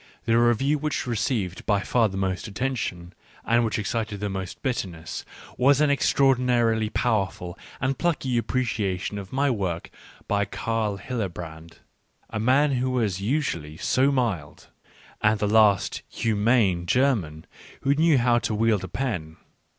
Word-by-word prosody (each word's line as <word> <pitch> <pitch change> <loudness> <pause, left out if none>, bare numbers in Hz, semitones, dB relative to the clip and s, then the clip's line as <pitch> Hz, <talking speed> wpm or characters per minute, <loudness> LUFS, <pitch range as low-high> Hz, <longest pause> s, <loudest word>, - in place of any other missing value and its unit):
The 115 - +2
review 120 +5 +3
which 150 0 -2
received 110 -6 -2
by 100 -2 +2
far 115 +1 +2
the, 95 - -6
most 95 0 -2
attention, 105 -6 -3 0.3
and 120 +1 +3
which 115 +1 -1
ex 105 -4 -2
cited 110 -3 -2
the 105 0 -2
most 95 -2 -6
bitterness, 90 - -3 0.3
was 135 +2 +4
an 150 -1 +4
extraordinarily 125 -5 +2
powerful 100 -7 -1 0.2
and 135 +1 0
plucky 140 -6 -1
appreciation 105 -6 -2
of 95 -2 -9
my 140 +1 +1
work 95 -7 -3 0.4
by 100 0 +1
Carl 110 -3 -2
Hillebrand, 85 -8 -6 0.5
a 110 - -3
man 135 +6 +3
who 130 0 0
was 110 -7 0
usually 100 - -2
so 130 +9 +2
mild, 110 - -2 0.5
and 105 +1 +3
the 105 - -1
last 105 -2 +3
humane 105 -5 +1
German 105 - +1 0.4
who 140 - +3
knew 155 0 +4
how 120 -1 +3
to 110 - -2
wield 110 -2 +2
a - - -4
pen. 90 -9 -3
110 Hz, 145 wpm, -25 LUFS, 95-130 Hz, 0.5 s, was